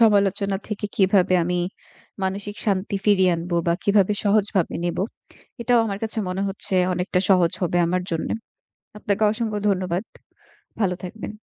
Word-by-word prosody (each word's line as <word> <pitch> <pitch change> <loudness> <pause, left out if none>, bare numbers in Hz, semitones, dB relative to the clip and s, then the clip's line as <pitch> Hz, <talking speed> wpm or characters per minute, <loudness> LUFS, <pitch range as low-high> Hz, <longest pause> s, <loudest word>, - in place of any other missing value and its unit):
সমালোচনা 200 -2 +3
থেকে 210 -1 -3
কিভাবে 190 -1 +4
আমি 180 0 0 0.7
মানসিক 200 +2 -3
শান্তি 200 0 0
ফিরিয়ে 190 -3 +4
আনবো 170 +1 -3
বা 170 - +4
কিভাবে 200 0 +4
সহজভাবে 205 -3 +2
নিবো 175 +2 0 0.6
এটাও 240 0 +4
আমার 200 -1 -3
কাছে 220 0 -3
মনে 185 +2 -2
হচ্ছে 195 0 -4 0.2
অনেকটা 180 +1 0
সহজ 180 -2 +4
হবে 175 0 +1
আমার 180 +1 0
জন্যে। 165 +5 -1 0.6
আপনাকে 205 +1 -1
অসংখ্য 220 -2 -2
ধন্যবাদ। 185 0 0 0.8
ভালো 185 -3 +2
থাকবেন। 215 +3 -7
195 Hz, 140 wpm, -23 LUFS, 180-210 Hz, 0.8 s, কিভাবে